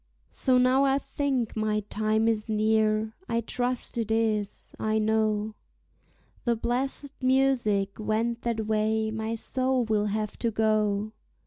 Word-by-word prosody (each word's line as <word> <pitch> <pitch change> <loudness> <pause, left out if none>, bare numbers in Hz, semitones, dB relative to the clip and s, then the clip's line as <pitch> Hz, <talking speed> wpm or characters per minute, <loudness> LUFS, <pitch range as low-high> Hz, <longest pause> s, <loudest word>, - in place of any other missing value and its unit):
So 260 -2 +3
now 255 +2 +4
I 270 0 +3
think 275 -5 -2
my 215 -1 0
time 215 +2 0
is 220 -1 0
near; 215 0 +1 0.2
I 230 - +1
trust 245 +1 -2
it 225 - -2
is. 220 -2 -1
I 215 0 0
know 215 0 +1 0.9
The 235 -2 +1
blessèd 265 +4 -2
music 255 -7 +2
went 225 +2 -1
that 230 -2 -2
way 220 0 0
my 220 +1 -3
soul 255 +2 +1
will 215 -2 0
have 210 0 -3
to 235 - +1
go. 215 -1 +1
220 Hz, 135 wpm, -27 LUFS, 215-240 Hz, 0.9 s, now